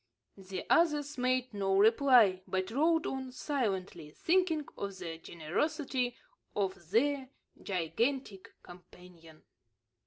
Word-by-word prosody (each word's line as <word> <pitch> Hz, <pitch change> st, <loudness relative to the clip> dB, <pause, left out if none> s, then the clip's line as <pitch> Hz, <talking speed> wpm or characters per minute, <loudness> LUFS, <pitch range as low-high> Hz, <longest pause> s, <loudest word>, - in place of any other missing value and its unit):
The 190 Hz, -1 st, -7 dB
others 295 Hz, -4 st, +2 dB
made 255 Hz, -1 st, 0 dB
no 195 Hz, -1 st, +1 dB
reply, 225 Hz, -3 st, +5 dB
but 185 Hz, +2 st, -2 dB
rode 320 Hz, +6 st, +2 dB
on 265 Hz, -1 st, -4 dB
silently, 195 Hz, -, -3 dB
thinking 330 Hz, -, +1 dB
of 200 Hz, -1 st, -5 dB
the 165 Hz, -3 st, -6 dB
generosity 250 Hz, -, -2 dB, 0.4 s
of 190 Hz, -4 st, -2 dB
their 265 Hz, +5 st, +1 dB, 0.3 s
gigantic 200 Hz, -, -2 dB
companion. 175 Hz, -2 st, -15 dB
225 Hz, 100 wpm, -32 LUFS, 185-275 Hz, 0.4 s, reply